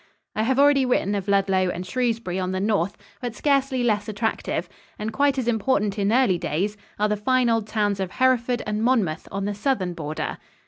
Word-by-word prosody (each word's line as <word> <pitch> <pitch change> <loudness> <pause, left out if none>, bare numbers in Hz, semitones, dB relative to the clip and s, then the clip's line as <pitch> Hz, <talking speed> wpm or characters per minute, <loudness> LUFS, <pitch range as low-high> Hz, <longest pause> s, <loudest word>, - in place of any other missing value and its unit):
I 215 - 0
have 255 +4 +1
already 285 -1 +5
written 245 -5 +1
of 200 -1 -3
Ludlow 195 -2 +2
and 180 +1 -4
Shrewsbury 230 -3 -1
on 185 0 -2
the 185 - -1
north, 200 -2 0 0.2
but 240 -2 -4
scarcely 275 -3 +1
less 210 -3 +1
attractive 215 +2 -2 0.3
and 215 +1 -4
quite 280 -1 +2
as 255 -3 -1
important 215 -3 +1
in 200 +1 +1
early 230 -8 +3
days 195 +8 -1 0.2
are 210 - +2
the 210 - 0
fine 250 +3 +2
old 225 -2 0
towns 205 -2 0
of 190 -1 -3
Hereford 250 -1 +2
and 210 0 -2
Monmouth 220 -11 +1
on 195 +1 -3
the 205 - -1
southern 205 -5 -1
border. 155 -2 -4
210 Hz, 195 wpm, -24 LUFS, 195-250 Hz, 0.3 s, already